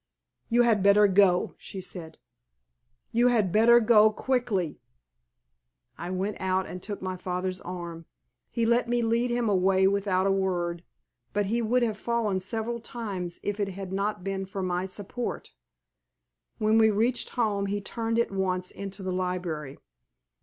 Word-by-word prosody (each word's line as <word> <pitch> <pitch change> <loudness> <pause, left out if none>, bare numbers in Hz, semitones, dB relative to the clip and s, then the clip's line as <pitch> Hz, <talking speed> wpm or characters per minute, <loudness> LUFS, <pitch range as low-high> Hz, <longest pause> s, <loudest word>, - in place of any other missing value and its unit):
"You 240 +1 +4
had 225 -4 +3
better 200 +1 +6
go," 190 -2 +3
she 195 - -8
said. 175 -3 -8 0.9
"You 240 +2 +4
had 220 -7 +2
better 230 +4 +6
go 220 -2 +6
quickly." 215 - -1 1.1
I 175 - -6
went 190 +3 -2
out 190 0 +1
and 180 - -7
took 205 -1 -6
my 185 0 -3
father's 185 0 -3
arm. 170 -2 -7 0.4
He 230 -1 0
let 235 +1 +2
me 240 0 +1
lead 230 +2 +1
him 240 -1 0
away 190 -1 +3
without 195 -1 +1
a 195 - +3
word; 175 -3 -1 0.5
but 205 0 +1
he 235 - +2
would 240 +2 +2
have 215 -3 -1
fallen 230 -5 0
several 225 +5 -3
times 200 -7 -5
if 205 0 -2
it 200 - 0
had 190 0 -7
not 200 -1 -2
been 195 0 -3
for 195 0 -4
my 180 +1 -1
support. 205 +5 -5 1.1
When 220 0 +3
we 220 0 +6
reached 230 +4 +1
home 205 -4 +1
he 205 +1 -1
turned 225 +2 -2
at 235 - +1
once 185 -2 -1
into 195 0 -7
the 185 -1 -2
library. 180 -6 -3
200 Hz, 160 wpm, -27 LUFS, 185-225 Hz, 1.1 s, better